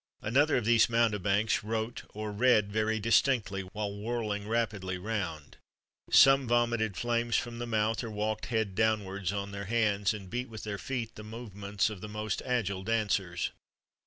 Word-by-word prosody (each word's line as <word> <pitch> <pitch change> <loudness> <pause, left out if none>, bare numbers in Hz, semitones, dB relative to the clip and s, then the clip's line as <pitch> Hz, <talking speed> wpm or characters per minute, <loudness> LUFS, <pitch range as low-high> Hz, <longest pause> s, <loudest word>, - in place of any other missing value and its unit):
Another 140 +8 +3
of 120 - -1
these 115 0 +5
mountebanks 105 -2 +2
wrote 110 +2 -3
or 105 0 -4
read 105 -2 +3
very 110 +1 0
distinctly 110 -2 +2
while 100 +2 -5
whirling 105 -1 -3
rapidly 105 -5 -1
round.[XXXV 90 -7 -4 0.5
88] - - +2
Some 135 -1 +7
vomited 120 -4 +1
flames 120 +2 0
from 120 -1 -1
the 120 - -4
mouth, 110 0 0
or 115 - -4
walked, 110 0 -2
head 110 -4 -1
downwards, 100 -3 0
on 100 0 -4
their 100 0 -5
hands, 105 -2 +1
and 100 -3 -9
beat 125 +5 -4
with 110 -2 -8
their 105 -2 -4
feet 120 -4 -4
the 105 - -10
movements 105 -2 -3
of 100 -4 -8
the 105 - -6
most 105 -1 -3
agile 110 -7 -1
dancers. 100 -5 0
110 Hz, 165 wpm, -30 LUFS, 100-115 Hz, 0.5 s, Some